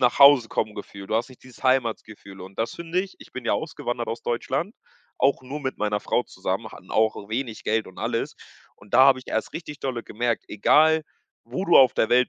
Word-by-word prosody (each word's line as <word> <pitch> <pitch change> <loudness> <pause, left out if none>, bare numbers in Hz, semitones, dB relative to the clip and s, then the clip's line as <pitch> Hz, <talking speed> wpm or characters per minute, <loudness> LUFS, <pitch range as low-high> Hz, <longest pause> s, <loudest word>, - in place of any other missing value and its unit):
Nach-Hause-Kommen-Gefühl. 120 -6 +3
Du - - -1
hast 115 +2 -1
nicht 130 - -17
dieses 130 0 -16
Heimatgefühl. 110 -6 -1
Und 95 +1 -11
das 115 +1 -1
finde 170 +1 -1
ich 190 0 -8
ich - - -15
bin 130 - -7
ja - - +1
ausgewandert 125 -7 -3
aus 115 - -4
Deutschland, 135 - -2 0.4
auch 135 -1 +2
nur 135 +4 -6
mit 130 -2 -3
meiner 105 0 0
Frau - - +1
zusammen, - - -4
hatten - - -14
auch 110 -2 +1
wenig 115 0 -4
Geld 110 0 0
und 95 - -13
alles. 115 +1 -2 0.4
Und 100 - -10
da - - +7
habe 135 -1 +5
ich 130 - -13
erst 110 - -2
richtig 150 -3 -7
dolle 125 -3 -3
gemerkt: 120 +1 -2
„Egal, 155 +9 +4 0.4
wo 125 +11 -4
du 170 - +6
auf 130 -2 +7
der 110 - +2
Welt 125 +1 +4
120 Hz, 205 wpm, -25 LUFS, 110-140 Hz, 0.4 s, da